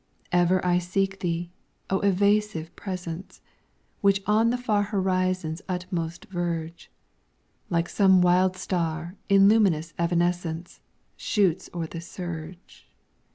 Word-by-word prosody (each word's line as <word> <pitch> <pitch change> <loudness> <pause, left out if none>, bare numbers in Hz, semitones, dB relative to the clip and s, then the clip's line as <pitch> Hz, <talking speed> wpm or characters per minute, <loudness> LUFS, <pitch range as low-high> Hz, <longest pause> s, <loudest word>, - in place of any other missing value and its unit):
Ever 180 +1 +3
I 180 0 +3
seek 195 +2 -1
Thee, 175 -1 -2 0.4
O 190 - +2
evasive 200 -3 +1
Presence, 180 -2 -6 0.6
Which 200 -1 +3
on 215 +2 +3
the 245 - 0
far 220 -4 +1
horizon's 185 -4 -1
utmost 180 -1 -3
verge, 170 -4 -4 0.8
Like 170 -1 +1
some 190 -2 +4
wild 180 +1 +3
star 170 -1 -2
in 195 0 +6
luminous 180 -7 +3
evanescence, 170 0 -1 0.4
Shoots 190 -6 +1
o'er 170 -2 -3
the 165 +1 -7
surge. 170 0 -8
180 Hz, 110 wpm, -26 LUFS, 170-195 Hz, 0.8 s, in